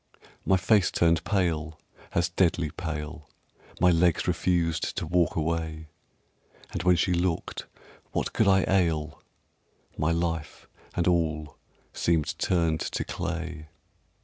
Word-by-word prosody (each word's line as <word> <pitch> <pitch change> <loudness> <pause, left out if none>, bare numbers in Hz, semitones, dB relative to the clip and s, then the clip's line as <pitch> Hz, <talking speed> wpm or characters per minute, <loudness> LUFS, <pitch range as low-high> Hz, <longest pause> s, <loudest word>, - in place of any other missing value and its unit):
My 95 - +5
face 95 0 +3
turned 85 -2 +2
pale 80 -6 0 0.3
as 85 +2 +1
deadly 85 -3 +1
pale, 80 -2 -6 0.5
My 90 +1 +5
legs 85 +1 +2
refused 85 -2 0
to - - -1
walk 85 0 +1
away, 80 -1 -2 0.8
And - - -3
when 90 +1 +4
she 90 +2 +1
looked 85 -1 -1 0.4
"what - - -2
could 110 - +2
I 95 -1 +4
ail?" 80 -6 +1 0.8
My 75 +2 +2
life 85 -2 -2 0.3
and 85 - +1
all 80 -4 0 0.4
seemed 80 -3 +1
turned 85 -3 +1
to - - -2
clay. 85 -3 -5
85 Hz, 120 wpm, -27 LUFS, 80-90 Hz, 0.8 s, My